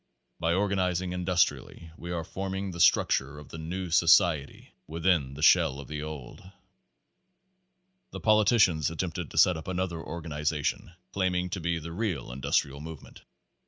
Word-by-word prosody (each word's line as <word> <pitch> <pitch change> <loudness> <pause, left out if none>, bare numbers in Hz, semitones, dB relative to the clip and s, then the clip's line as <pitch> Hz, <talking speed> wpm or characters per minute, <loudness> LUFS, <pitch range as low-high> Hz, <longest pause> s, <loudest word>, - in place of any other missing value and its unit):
By 85 0 +1
organizing 95 -2 0
industrially 90 -2 -1
we 85 - -9
are 85 -1 -2
forming 95 +2 -4
the 85 - -8
structure 70 -3 +3
f 75 - -13
the 80 - -8
new 90 +2 -5
society 85 -3 +3
within 80 -4 0
the 75 - -6
shell 80 -5 +5
of 70 - -9
the 75 +2 -5
old. 75 -5 -8 1.7
The - - -8
politicians 105 - +3
attempted 80 0 -4
to - - -10
set 90 -3 +5
up 80 - -9
another 95 -2 -2
organi 80 -2 -6
zation, 75 +2 -2 0.2
claiming 90 -2 0
to 95 - -3
be 85 0 -1
the 80 +1 -7
real 85 - -3
industrial 70 +2 -1
movement. 80 -2 -10
85 Hz, 150 wpm, -28 LUFS, 75-90 Hz, 1.7 s, shell